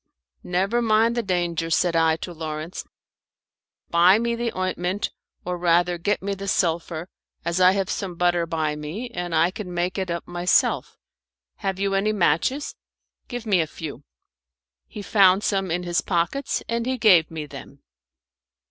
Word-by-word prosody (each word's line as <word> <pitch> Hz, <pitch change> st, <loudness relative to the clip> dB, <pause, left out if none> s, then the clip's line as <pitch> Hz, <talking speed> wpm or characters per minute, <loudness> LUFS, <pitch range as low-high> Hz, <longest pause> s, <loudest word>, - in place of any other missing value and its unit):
"Never 195 Hz, +7 st, 0 dB
mind 225 Hz, 0 st, +3 dB
the 240 Hz, -, +1 dB
danger," 175 Hz, -4 st, -1 dB
said 165 Hz, +2 st, +2 dB
I 160 Hz, -1 st, +4 dB
to 175 Hz, -, -9 dB
Lawrence; 160 Hz, +1 st, -5 dB, 1.1 s
"buy 175 Hz, +4 st, +6 dB
me 235 Hz, +1 st, 0 dB
the 235 Hz, 0 st, -2 dB
ointment, 185 Hz, +1 st, -1 dB, 0.3 s
or 180 Hz, 0 st, -3 dB
rather 175 Hz, 0 st, +2 dB
get 205 Hz, +3 st, -1 dB
me 200 Hz, 0 st, -1 dB
the 195 Hz, 0 st, -6 dB
sulphur, 170 Hz, -2 st, -1 dB, 0.4 s
as 170 Hz, +2 st, 0 dB
I 185 Hz, +1 st, +7 dB
have 195 Hz, -1 st, -1 dB
some 190 Hz, -3 st, -4 dB
butter 175 Hz, -1 st, +1 dB
by 155 Hz, -2 st, -1 dB
me, 170 Hz, +12 st, -6 dB
and 175 Hz, -5 st, -3 dB
I 165 Hz, +3 st, +3 dB
can 190 Hz, -1 st, -7 dB
make 175 Hz, +2 st, -1 dB
it 190 Hz, -1 st, -3 dB
up 170 Hz, 0 st, -4 dB
myself. 175 Hz, +1 st, +1 dB, 0.6 s
Have 195 Hz, -2 st, -3 dB
you 195 Hz, 0 st, 0 dB
any 205 Hz, +2 st, +1 dB
matches? 205 Hz, -, +1 dB, 0.5 s
Give 245 Hz, -1 st, -6 dB
me 195 Hz, -5 st, +3 dB
a 160 Hz, -, -2 dB
few." 150 Hz, -3 st, -8 dB, 0.8 s
He 205 Hz, -, -8 dB
found 195 Hz, -1 st, +4 dB
some 195 Hz, -2 st, 0 dB
in 175 Hz, +2 st, -1 dB
his 175 Hz, -1 st, 0 dB
pockets, 180 Hz, +10 st, -1 dB
and 235 Hz, +1 st, -2 dB
he 260 Hz, 0 st, 0 dB
gave 185 Hz, -9 st, +5 dB
me 160 Hz, -2 st, -5 dB
them. 140 Hz, -1 st, -12 dB
180 Hz, 165 wpm, -24 LUFS, 170-200 Hz, 1.1 s, I